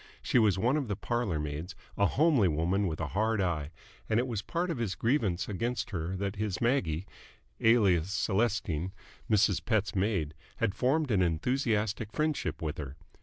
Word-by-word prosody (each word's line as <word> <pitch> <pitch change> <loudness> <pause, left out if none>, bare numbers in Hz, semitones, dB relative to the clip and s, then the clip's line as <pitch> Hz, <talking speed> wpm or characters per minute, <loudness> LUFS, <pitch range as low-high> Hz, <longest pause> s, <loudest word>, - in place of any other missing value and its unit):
She 125 - +3
was 105 -5 +3
one 125 +9 +2
of 140 -5 -2
the 105 - -1
parlour 110 -6 -1
maids, 75 +6 -5 0.2
a 100 - +3
homely 145 - +3
woman 90 +5 +1
with 80 -2 -3
a 80 -3 -2
hard 110 +1 +1
eye, 85 -6 -1 0.4
and 110 - +3
it 125 - +1
was 115 -6 -3
part 175 - -2
of 150 - -3
his 105 -6 -1
grievance 110 - 0
against 110 +2 -2
her 90 0 -3
that 100 +1 -3
his 105 -3 -2
Maggie, 100 - +1 0.5
alias 100 -7 +4
Celestine, 95 -5 0 0.4
Mrs. 105 -1 +3
Pett's 110 -4 0
maid, 95 -6 0 0.2
had 110 -4 0
formed 135 +4 +1
an 100 -3 +3
enthusiastic 110 - 0
friendship 155 - -1
with 80 +1 -3
her. 70 -2 -6
100 Hz, 170 wpm, -30 LUFS, 90-120 Hz, 0.5 s, alias